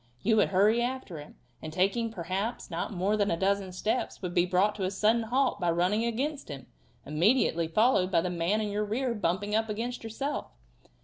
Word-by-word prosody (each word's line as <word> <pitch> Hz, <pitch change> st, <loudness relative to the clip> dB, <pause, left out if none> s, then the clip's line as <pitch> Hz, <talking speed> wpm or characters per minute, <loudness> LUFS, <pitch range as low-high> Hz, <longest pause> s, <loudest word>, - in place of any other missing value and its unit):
You 220 Hz, +1 st, +3 dB
would -, -, +4 dB
hurry 210 Hz, +5 st, +3 dB
after 245 Hz, -9 st, -4 dB
him, 145 Hz, -, -12 dB, 0.3 s
and 155 Hz, -, -6 dB
taking, 195 Hz, +7 st, +1 dB
perhaps, 195 Hz, +3 st, -4 dB
not 170 Hz, +5 st, -3 dB
more 195 Hz, +2 st, 0 dB
than 205 Hz, -1 st, +1 dB
a 165 Hz, -, 0 dB
dozen 195 Hz, 0 st, 0 dB
steps, 215 Hz, +7 st, -2 dB
would 180 Hz, -1 st, -3 dB
be 175 Hz, +1 st, +3 dB
brought 190 Hz, +3 st, +2 dB
to 195 Hz, -, -3 dB
a -, -, 0 dB
sudden 215 Hz, +4 st, +2 dB
halt 250 Hz, +1 st, 0 dB
by 175 Hz, -2 st, +1 dB
running 180 Hz, +7 st, +1 dB
against 270 Hz, -, -2 dB
him, 135 Hz, -3 st, -7 dB, 0.4 s
immediately 170 Hz, -, +2 dB
followed 200 Hz, +1 st, +3 dB
by 175 Hz, -, +3 dB
the 180 Hz, +1 st, -2 dB
man 180 Hz, +5 st, 0 dB
in 210 Hz, -, -2 dB
your 205 Hz, +1 st, -1 dB
rear 235 Hz, +4 st, -1 dB
bumping 205 Hz, 0 st, -1 dB
up 220 Hz, +1 st, +1 dB
against 235 Hz, +4 st, -4 dB
yourself. 270 Hz, +6 st, -4 dB
205 Hz, 200 wpm, -29 LUFS, 180-225 Hz, 0.4 s, would